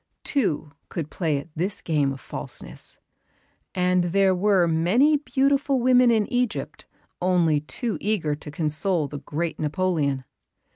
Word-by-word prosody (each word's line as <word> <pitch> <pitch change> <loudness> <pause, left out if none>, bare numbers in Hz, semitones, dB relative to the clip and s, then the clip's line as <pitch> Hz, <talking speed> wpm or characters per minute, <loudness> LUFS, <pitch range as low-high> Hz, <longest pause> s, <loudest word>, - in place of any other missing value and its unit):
Two 160 - 0 0.2
could 155 -4 -5
play 160 -5 0
at 140 +4 -7
this 185 +5 -2
game 145 -4 0
of 135 - -6
falseness; 60 - -4 0.8
and 180 -1 +2
there 190 +2 +3
were 185 -1 +3
many 185 - +3
beautiful 275 -1 +1
women 250 0 +5
in 220 -3 +3
Egypt 245 -2 -2 0.3
only 175 -4 +3
too 220 - -3
eager 195 -8 0
to 150 +1 -8
console 155 +2 0
the 145 +1 -7
great 160 +4 -4
Napoleon. 150 -4 0
180 Hz, 135 wpm, -24 LUFS, 150-215 Hz, 0.8 s, women